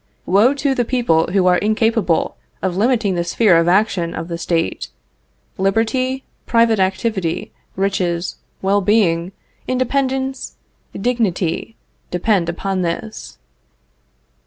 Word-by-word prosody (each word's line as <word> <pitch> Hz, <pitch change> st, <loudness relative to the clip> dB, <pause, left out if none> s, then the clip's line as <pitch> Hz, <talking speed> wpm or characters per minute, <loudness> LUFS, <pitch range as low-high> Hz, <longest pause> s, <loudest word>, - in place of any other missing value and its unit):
Woe 215 Hz, +9 st, +4 dB
to 275 Hz, 0 st, 0 dB
the 245 Hz, -, +1 dB
people 230 Hz, -10 st, +1 dB
who 190 Hz, -1 st, +2 dB
are 180 Hz, -1 st, +4 dB
incapable 215 Hz, -5 st, +1 dB, 0.3 s
of 185 Hz, -2 st, -1 dB
limiting 220 Hz, -1 st, +2 dB
the 175 Hz, -1 st, 0 dB
sphere 190 Hz, +2 st, +3 dB
of 165 Hz, 0 st, +3 dB
action 180 Hz, -2 st, +1 dB
of 165 Hz, -, -5 dB
the 170 Hz, -, -3 dB
State. 130 Hz, -, -1 dB, 0.7 s
Liberty, 240 Hz, +7 st, 0 dB, 0.2 s
private 230 Hz, -2 st, +3 dB
activity, 190 Hz, -2 st, -1 dB, 0.2 s
riches, 185 Hz, -3 st, -1 dB, 0.3 s
well 200 Hz, +1 st, +2 dB
being, 185 Hz, -4 st, +2 dB, 0.4 s
independence, 265 Hz, +1 st, -1 dB, 0.4 s
dignity, 215 Hz, -4 st, -1 dB, 0.3 s
depend 180 Hz, -1 st, +1 dB
upon 190 Hz, +2 st, -2 dB
this. 180 Hz, +6 st, -4 dB
195 Hz, 110 wpm, -19 LUFS, 175-230 Hz, 0.7 s, Woe